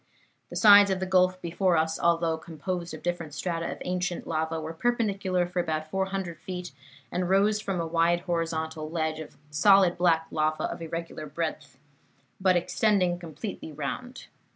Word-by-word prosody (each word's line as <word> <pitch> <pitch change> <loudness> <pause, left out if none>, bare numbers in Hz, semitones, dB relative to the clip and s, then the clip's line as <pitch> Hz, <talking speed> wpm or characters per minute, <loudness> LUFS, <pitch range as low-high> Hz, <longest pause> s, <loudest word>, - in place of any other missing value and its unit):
The - - -8
sides 205 -2 +8
of 190 -1 0
the 190 - -1
gulf 185 0 +3
before 175 +1 +1
us, 160 0 0
although 170 -1 +2
composed 170 +2 -5
of - - -12
different 170 -4 -3
strata 170 -2 -2
of - - -6
ancient 180 -1 -2
lava, 160 0 -1
were 160 +1 -5
perpendicular 195 -3 0
for 180 +1 -3
about 155 -2 -2
400 190 -3 -2
feet, 180 0 -6 0.4
and 180 0 -1
rose 205 +2 +3
from 195 -4 -2
a 165 - -1
wide 170 +1 +2
horizontal 160 -3 -2
ledge 160 -1 -2
of 155 - -9
solid 190 +2 +5
black 165 -2 +3
lava 155 0 0
of - - -3
irregular 165 -1 -5
breadth, 155 -2 -4 0.6
but 185 -1 +4
extending 180 0 +2
completely 170 +1 -7
round. 200 - -5
175 Hz, 160 wpm, -27 LUFS, 160-185 Hz, 0.6 s, sides